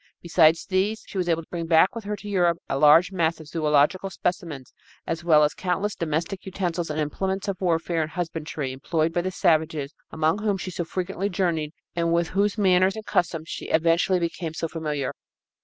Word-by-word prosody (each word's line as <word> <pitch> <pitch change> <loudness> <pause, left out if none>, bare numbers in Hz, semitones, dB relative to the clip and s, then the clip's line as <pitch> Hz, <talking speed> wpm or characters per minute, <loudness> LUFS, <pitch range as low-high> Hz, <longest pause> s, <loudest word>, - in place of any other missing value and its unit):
Besides 165 -1 +4
these, 200 +3 0
she 195 - -5
was 175 -1 -1
able 165 0 +1
to - - -23
bring 170 -2 -4
back 165 +3 +5
with 230 -2 -7
her 210 +1 -2
to 210 - -11
Europe 175 -4 +2
a 135 - -1
large 155 +5 +6
mass 165 -3 0
of 160 - -10
zoölogical 155 +4 +1
specimens 170 - -4 0.3
as 165 +1 -3
well 155 -3 +5
as 150 - +2
countless 190 +3 -1
domestic 165 +4 -3
utensils 175 -3 -3
and 150 0 -2
implements 190 +6 -2
of 195 -2 -3
warfare 165 -1 +1
and 155 - -2
husbandry 160 -5 -4
employed 155 +5 -1
by 175 - +1
the 185 - -2
savages 160 -6 +1 0.2
among 160 +4 0
whom 205 -2 0
she 185 0 -5
so 175 -1 -3
frequently 190 +3 -3
journeyed 170 -5 -1 0.2
and 170 -1 0
with 170 0 +1
whose 200 +3 +1
manners 190 -1 +3
and 220 -1 -7
customs 165 -2 0
she - - -6
eventually 165 +3 +3
became 170 -1 -3
so 165 - -2
familiar. 150 -4 -3
170 Hz, 195 wpm, -25 LUFS, 160-185 Hz, 0.3 s, large